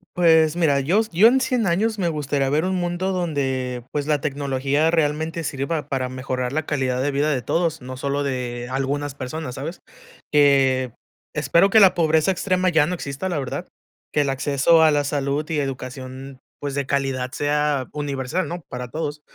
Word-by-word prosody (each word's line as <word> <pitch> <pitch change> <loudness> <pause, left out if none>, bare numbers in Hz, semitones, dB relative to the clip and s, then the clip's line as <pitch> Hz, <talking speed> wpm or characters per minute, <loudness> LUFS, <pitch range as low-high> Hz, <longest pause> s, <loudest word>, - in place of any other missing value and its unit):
Pues 160 -2 +4
mira, 155 -5 +2
yos 195 +11 +1
yo 185 +6 +6
en 260 +3 +4
100 250 -4 0
años 210 +5 +1
me 175 -3 +1
gustaría 145 -3 -1
ver 150 +4 +1
un 190 0 0
mundo 175 +1 -1
donde, 135 -8 -2
pues, 145 -1 -2
la 150 -1 +2
tecnología 140 +1 0
realmente 160 +1 0
sirva 145 +2 -3
para 130 -2 -2
mejorar 130 -1 -3
la 155 +1 -2
calidad 130 -4 -1
de 145 +2 0
vida 145 +2 +1
de 130 -4 0
todos, 165 +3 0
no 130 +1 -7
solo 140 +2 -2
de 125 -3 -3
algunas 140 +2 -2
personas, 130 0 -5
¿sabes? 160 +6 -6 0.5
Eh, 135 -3 +4 0.4
espero 170 +5 +3
que 220 - +6
la 195 -3 +7
pobreza 160 +1 +2
extrema 185 0 +1
ya 160 -4 +4
no 180 - -2
exista, 140 +3 -4
la 175 - -1
verdad. 135 -3 -4 0.4
Que 150 - +2
el 140 - 0
acceso 140 +4 +3
a 160 - +6
la 145 -1 +2
salud 140 +1 -1
y 160 -2 0
educación, 130 0 -6 0.2
pues, 145 -1 -4
de 140 -2 -2
calidad 135 -2 -1
sea 145 -2 0
universal, 145 +3 -2
¿no? 175 +1 -5
Para 125 -1 -6
todos. 150 +1 -4
145 Hz, 185 wpm, -22 LUFS, 135-165 Hz, 0.5 s, la